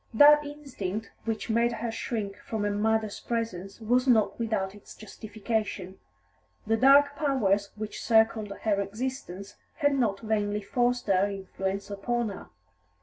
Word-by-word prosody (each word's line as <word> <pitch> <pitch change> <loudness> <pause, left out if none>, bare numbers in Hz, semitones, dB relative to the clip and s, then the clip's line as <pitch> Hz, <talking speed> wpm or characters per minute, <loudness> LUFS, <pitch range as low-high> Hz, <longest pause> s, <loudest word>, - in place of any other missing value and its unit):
That 295 +4 +8
instinct 250 -9 -6
which 225 -1 -2
made 235 +1 +2
her 230 0 -3
shrink 215 -4 -3
from 220 -2 -4
her 205 - 0
mother's 215 0 0
presence 225 -5 -4
was 245 +4 +1
not 225 -3 +3
without 215 -4 -1
its 205 0 -13
justification; 215 -3 -4 0.7
the 225 - +2
dark 280 +4 +6
powers 215 -9 +1
which 215 0 -6
circled 220 -2 +3
her 205 -2 +2
existence 205 -3 -5 0.2
had 285 -2 +2
not 225 -7 0
vainly 210 -2 -1
forced 245 +3 0
their 195 0 +2
influence 195 0 -4
upon 235 +3 -1
her. 195 - -9
220 Hz, 140 wpm, -28 LUFS, 200-240 Hz, 0.7 s, That